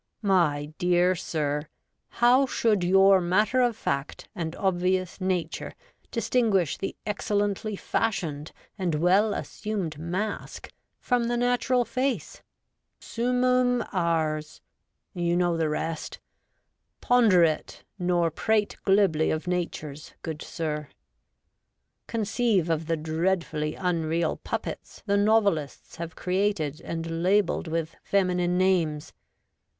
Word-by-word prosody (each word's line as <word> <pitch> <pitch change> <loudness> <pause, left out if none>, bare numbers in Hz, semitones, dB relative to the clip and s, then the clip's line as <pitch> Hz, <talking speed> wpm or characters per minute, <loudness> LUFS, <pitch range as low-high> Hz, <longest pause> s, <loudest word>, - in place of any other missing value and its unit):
My 155 -7 +2
dear 180 +1 +3
sir, 150 -3 -2 0.4
how 250 +3 +4
should 215 -6 +1
your 195 +1 +5
matter 210 +8 +2
of 240 -3 +1
fact 140 -5 -3
and 165 -1 -4
obvious 185 0 0
nature 185 -2 -2 0.4
distinguish 225 - +1
the 195 - -4
excellently 205 0 -1
fashioned 165 -9 -2 0.3
and 175 -4 0
well 185 +7 +3
assumed 190 -8 -4
mask 185 +6 -4 0.3
from 245 -2 0
the 240 +1 0
natural 245 0 +2
face? 255 - -2 0.6
Swnmum 250 +1 +1
ars 160 -4 -1 0.5
you 175 -1 0
know 175 -1 +2
the 160 -2 0
rest. 160 +1 -4 0.8
Ponder 225 -8 +5
it, 155 -2 -1 0.2
nor 175 -2 +1
prate 210 +5 0
glibly 195 -6 +3
of 155 +2 -2
natures, 160 -4 -4
good 160 -2 -5
sir! 150 -3 -4 1.2
Conceive 220 -5 +1
of 160 0 -1
the 165 -1 0
dreadfully 160 -1 -1
unreal 165 -2 0
puppets - - -6
the 200 -1 +1
novelists 200 - +1
have 165 -1 -6
created 180 -5 -1
and 165 0 -4
labelled 195 0 +2
with 165 0 -3
feminine 180 -2 +1
names. 170 -5 +1
180 Hz, 110 wpm, -26 LUFS, 160-210 Hz, 1.2 s, your